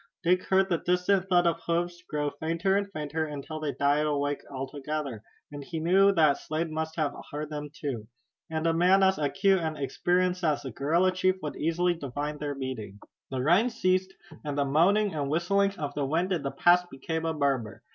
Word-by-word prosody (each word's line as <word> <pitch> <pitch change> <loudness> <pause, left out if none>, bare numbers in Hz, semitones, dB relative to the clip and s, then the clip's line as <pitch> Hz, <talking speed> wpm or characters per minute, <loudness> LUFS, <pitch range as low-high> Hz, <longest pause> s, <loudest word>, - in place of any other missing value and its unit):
Dick 180 +2 +2
heard 190 0 +3
the 170 -4 0
distant 180 +2 +1
thud 175 -1 +4
of 170 -1 +1
hoofs 175 +1 -1
growing 150 -1 -1
fainter 170 +5 0
and 200 0 -1
fainter 155 -1 -3
until 150 +1 -6
they 155 -2 -2
died 145 +2 +1
away 145 -1 -1
altogether, 140 -2 -4 0.3
and 145 -1 -7
he 160 +3 -5
knew 190 +5 +5
that 155 -5 +4
Slade 155 +1 -3
must 160 0 -3
have 150 -3 0 0.2
heard 150 +1 -5
them 150 -1 -5
too. 140 -10 -5 0.4
And 160 0 -2
a 165 - +3
man 180 +4 +4
as 190 -2 +3
acute 190 +6 +2
and 160 -2 -3
experienced 180 +6 0
as 155 -3 +1
the 130 - -5
guerrilla 165 - +2
chief 185 0 +1
would 150 - -4
easily 175 +3 +1
divine 145 -1 -5
their 145 -1 -3
meaning. 130 -7 -5 0.3
The 130 -1 -2
rain 180 - +4
ceased, 185 -4 0 0.3
and 145 -2 -4
the 140 - +2
moaning 190 +9 +3
and 145 -3 -2
whistling 195 +5 +1
of 145 -2 -4
the 145 - -2
wind 170 +6 0
in 170 - -1
the 140 - -2
pass 175 +5 +4
became 160 +2 -4
a 160 - 0
murmur. 135 -7 -1
160 Hz, 195 wpm, -28 LUFS, 145-180 Hz, 0.4 s, knew